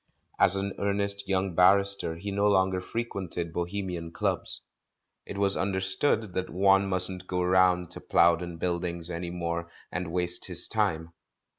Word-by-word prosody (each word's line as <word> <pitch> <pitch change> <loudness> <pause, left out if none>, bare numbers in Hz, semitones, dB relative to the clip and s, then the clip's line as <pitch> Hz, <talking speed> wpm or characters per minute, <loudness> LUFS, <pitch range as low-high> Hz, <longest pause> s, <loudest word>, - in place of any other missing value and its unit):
As 95 - +4
an 100 0 -2
earnest 100 0 -1
young 95 -1 0
barrister 100 -1 +4
he 100 +5 -6
no 100 +1 +1
longer 95 -2 +2
frequented 95 -7 -4
bohemian 90 -1 -4
clubs. - - -1 0.7
It - - -6
was 100 -1 +3
under 95 0 -1
stood 95 +2 0
that 95 0 -2
one 95 +2 +3
mustn't 90 0 +1
go 90 0 -1
round 90 -1 +3
to - - -7
Plowden 85 0 +2
Buildings 85 0 -2
any 85 +1 -4
more 85 -1 -3 0.2
and 90 -1 -4
waste 90 0 -1
his - - 0
time. 80 +1 -1
90 Hz, 150 wpm, -28 LUFS, 85-100 Hz, 0.7 s, As